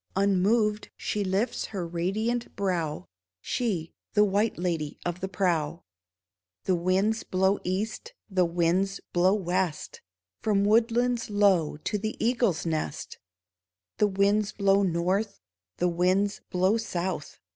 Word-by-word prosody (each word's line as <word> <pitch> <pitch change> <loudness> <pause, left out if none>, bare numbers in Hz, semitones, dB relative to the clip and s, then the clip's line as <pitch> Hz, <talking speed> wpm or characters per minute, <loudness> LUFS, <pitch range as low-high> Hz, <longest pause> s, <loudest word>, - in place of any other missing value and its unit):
Unmoved 205 +3 +2
she 210 - -2
lifts 200 +5 -1
her 190 -5 -4
radiant 205 +8 -2
brow 175 -6 -1 0.2
— 90 - -65
She, 180 - -2 0.2
the 210 0 +5
White 205 +3 +1
Lady 165 -4 -2
of 175 0 -2
the 190 - -3
Prow! 170 -4 0 0.8
The 185 - +1
winds 190 +5 +1
blow 190 +2 +1
east, 215 - -3
the 190 -3 +2
winds 175 +3 +1
blow 185 +3 +4
west, 180 -4 -2 0.4
From 200 -2 +2
woodlands 235 +2 +2
low 195 -7 +3
to 205 +7 -2
the 220 +2 -3
eagle's 235 -8 +1
nest; 155 - -3 0.8
The 210 - +5
winds 200 +1 +1
blow 200 -1 +3
north, 190 +3 0 0.4
the 180 - +2
winds 185 +4 +1
blow 185 +4 +2
south. 180 -7 -4
195 Hz, 125 wpm, -27 LUFS, 175-210 Hz, 0.8 s, the